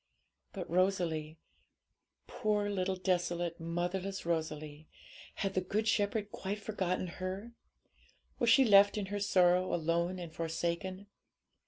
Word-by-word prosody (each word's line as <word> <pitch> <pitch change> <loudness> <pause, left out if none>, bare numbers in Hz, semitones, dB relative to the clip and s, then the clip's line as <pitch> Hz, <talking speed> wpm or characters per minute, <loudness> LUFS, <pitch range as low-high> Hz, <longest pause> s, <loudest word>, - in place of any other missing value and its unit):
But 185 -4 -6
Rosalie 170 -4 0 0.9
poor 210 -1 0
little 190 -1 0
desolate, 175 -2 -1
motherless 175 +4 -3
Rosalie! 155 -2 -3 0.5
had 195 -1 -2
the 185 - +1
Good 210 +4 -1
Shepherd 205 -1 +1
quite 200 +2 -4
forgotten 190 -4 -2
her? 185 +5 -5 0.9
Was 240 - +3
she 265 +3 +7
left 200 -1 +6
in 205 - -1
her 205 - -1
sorrow 185 -2 +3
alone 170 +2 0
and 170 -3 -7
forsaken? 170 +4 -3
185 Hz, 120 wpm, -33 LUFS, 170-200 Hz, 0.9 s, she